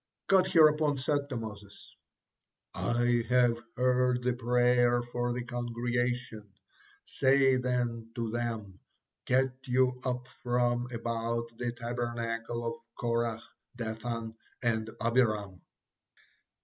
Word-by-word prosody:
'" - - -59
God 190 -1 +6
hereupon 155 -4 +5
said 140 +1 0
to 130 - -3
Moses 105 -3 -9 0.8
"I 120 0 +1
have 120 -2 +3 0.2
heard 125 0 +2
the 125 0 +2
prayer 120 0 +3
for 120 0 -2
the 120 0 -2
congregation. 120 -2 -2 0.5
Say 135 -1 +3
then, 120 -2 -1
to 115 -3 -2
them, 110 -5 -4 0.5
'Get 130 +1 +3 0.2
you 125 0 +2
up 125 -1 -2
from 120 -1 0
about 115 0 -3
the 120 -1 -1
Tabernacle 120 -1 -3
of 115 - -1 0.2
Korah, 115 -1 -1 0.3
Dathan, 115 0 -4 0.3
and 110 -2 0 0.2
Abiram.'" 110 -6 +1
120 Hz, 110 wpm, -30 LUFS, 115-125 Hz, 0.8 s, God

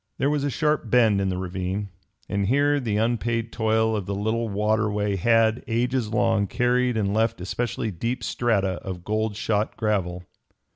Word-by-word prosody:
There 140 - +1
was 150 -2 0
a 145 - 0
sharp 150 -1 0
bend 110 -5 +4
in 95 - 0
the 90 - -2
ravine, 95 +2 -3 0.4
and 100 -1 -1
here 145 +4 +3
the 110 -6 -1
unpaid 115 0 0
toil 110 0 +1
of 100 -4 -3
the 100 - -2
little 110 +3 -1
waterway 105 0 0
had, 115 +3 +3
ages 120 0 0
long, 115 -3 +2
carried 125 +2 +1
and 100 -2 0
left 115 0 +1
especially 110 +4 -2
deep 115 +8 -3
strata 100 -6 0
of 90 -2 -6
gold 110 +1 -1
shot 105 0 -1
gravel. 90 -5 -1
110 Hz, 165 wpm, -24 LUFS, 100-120 Hz, 0.4 s, bend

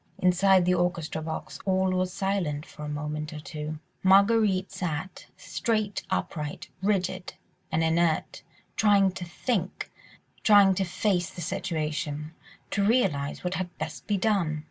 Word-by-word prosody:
Inside 185 0 +4
the 180 - +3
orchestra 170 -3 -1
box 160 0 -5
all 190 -1 +2
was 185 0 0
silent 180 -7 -1
for 150 - -10
a - - -4
moment 150 +1 -4
or 155 - -6
two. 150 0 -5 0.2
Marguerite 195 0 +4
sat, 180 -2 -4
straight 215 -4 -1
upright, 150 +3 -3
rigid 185 -2 -1 0.4
and 165 - +2
inert, 165 0 +1 0.3
trying 200 -2 +4
to 185 -1 -6
think, 190 +1 -2 0.5
trying 200 -2 +7
to 190 +1 0
face 180 0 0
the 175 - -8
situation, 155 -3 -3 0.4
to 200 - +1
realise 180 - +1
what 180 0 -1
had 180 -1 -4
best - - -6
be 205 - +1
done. 190 -7 +1
180 Hz, 140 wpm, -27 LUFS, 160-195 Hz, 0.5 s, trying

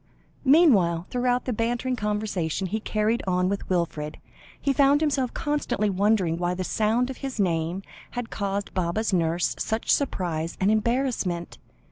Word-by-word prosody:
Meanwhile, 210 - +5
throughout 250 0 +1
the 255 - -1
bantering 240 +3 -1
conversation 210 -6 -2
he 210 +4 -2
carried 215 +2 0
on 180 0 +2
with 200 0 -3
Wilfred, 165 -4 -1 0.4
he 280 - +1
found 280 +1 +4
himself 280 -5 0
constantly 250 -8 0
wondering 190 -4 +2
why 175 0 0
the 185 - -3
sound 225 +6 +1
of 260 - -9
his 270 -5 -5
name, 170 0 0 0.3
had 245 -2 -4
caused 200 0 -3
Baba's 185 +4 -1
nurse 170 0 +1
such 220 +1 -1
surprise 170 - -1
and 195 +2 +3
embarrassment. 220 -6 -1
210 Hz, 145 wpm, -25 LUFS, 180-245 Hz, 0.4 s, Meanwhile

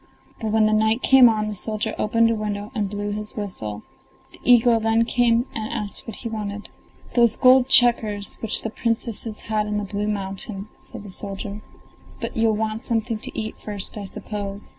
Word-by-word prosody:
But 225 - -3
when 220 0 +4
the 215 - +3
night 220 +3 +2
came 265 -2 +8
on 215 -1 0
the 215 - -3
soldier 215 +2 -2
opened 230 +2 +3
the 230 - +2
window 210 -1 -4
and 205 -2 -1
blew 205 0 -3
his 210 +1 -5
whistle. 110 - -5 0.5
The - - -17
eagle 240 -1 +5
then 225 +1 +2
came 240 0 +2
and 220 0 -4
asked 205 +2 -3
what 225 - -6
he 235 - -6
wanted. 210 -2 -5 0.4
"Those 235 -3 +4
gold 255 0 +6
checkers, 220 -5 +3
which 225 - -1
the 225 - -3
Princesses 225 -1 -2
had 215 -1 -1
in 210 0 -1
the 210 - -1
blue 205 +1 -3
mountain," 195 0 -4
said - - -10
the 205 - -10
soldier; 200 +2 -6 0.6
"but - - -5
you'll 225 -1 +2
want 215 +1 -2
something 230 -3 -1
to - - -5
eat 220 0 -5
first, 205 -2 -7
I 205 -2 -5
suppose? 200 0 -6
215 Hz, 190 wpm, -23 LUFS, 205-230 Hz, 0.6 s, came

